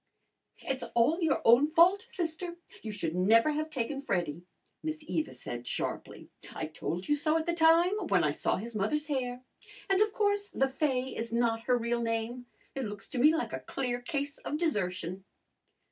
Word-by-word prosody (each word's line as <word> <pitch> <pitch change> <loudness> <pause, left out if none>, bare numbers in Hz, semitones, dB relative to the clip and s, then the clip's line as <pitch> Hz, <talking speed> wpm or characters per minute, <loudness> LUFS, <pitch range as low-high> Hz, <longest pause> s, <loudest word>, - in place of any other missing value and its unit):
"It's 265 -1 -2
all 295 +10 +3
your 325 - +1
own 240 +6 +7
fault, 365 +7 +5
sister. 345 0 -3 0.3
You 220 - -5
should 170 -6 -3
never 225 +10 +4
have 310 +1 -2
taken 275 0 -3
Freddy," 170 - -2 0.4
Miss 310 0 -4
Eva 315 -1 -1
said 120 0 -7
sharply. - - -4 0.2
"I - - -3
told 165 +3 -4
you 295 - +3
so 310 +2 +1
at 320 - -2
the 340 - 0
time, 335 +2 +5
when 180 -4 +3
I 150 - +2
saw - - 0
his 230 +4 -6
mother's 220 +9 0
hair. 255 -4 -3 0.5
And 385 +1 +4
of 430 0 +3
course 410 -1 0
Le 270 0 +2
Fay 265 -2 -1
is 230 0 -4
not 230 -1 +1
her 250 -1 +3
real 235 0 -1
name. 230 +2 -2 0.3
It 270 -2 -3
looks 205 -1 -7
to 265 - -3
me 305 +5 +6
like 325 - -2
a - - -2
clear 245 -2 -3
case 285 +1 -3
of 300 - -3
desertion." 190 - -2
260 Hz, 185 wpm, -30 LUFS, 225-315 Hz, 0.5 s, own